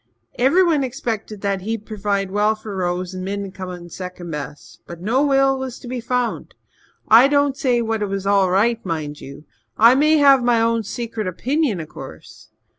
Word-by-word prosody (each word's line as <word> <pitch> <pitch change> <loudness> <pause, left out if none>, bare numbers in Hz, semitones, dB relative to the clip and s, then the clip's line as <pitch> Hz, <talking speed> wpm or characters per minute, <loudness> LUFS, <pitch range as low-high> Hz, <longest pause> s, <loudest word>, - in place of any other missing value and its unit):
Everyone 310 +3 +3
expected 230 -5 -4
that 200 -2 -1
he'd 220 +2 -4
purvide 200 -3 -2
well 210 +2 +2
for 215 -2 -8
Rose 180 0 -2
and 185 0 -6
Min'd 200 0 -4
come 185 -2 -7
in 175 -1 -9
second 180 -1 -7
best. 150 -1 -8
But 170 -1 -9
no 230 +10 +1
will 270 -1 +3
was 260 -2 -5
to 250 - -12
be 250 0 -4
found. 245 0 -2 0.5
I 230 +5 +7
don't 285 -1 +2
say 250 -3 +1
but 230 - -3
what 225 -1 -1
it 205 - 0
was 195 0 -4
all 195 -2 +3
right, 225 +5 +1
mind 155 -4 -4
you. 140 +3 -11 0.3
I 230 +3 +7
may 305 +4 +4
have 275 -3 +5
my 240 -1 +3
own 230 0 +1
secret 220 -1 -5
opinion, 255 - -1
of 155 -2 -7
course. - - -12
215 Hz, 190 wpm, -20 LUFS, 185-250 Hz, 0.5 s, I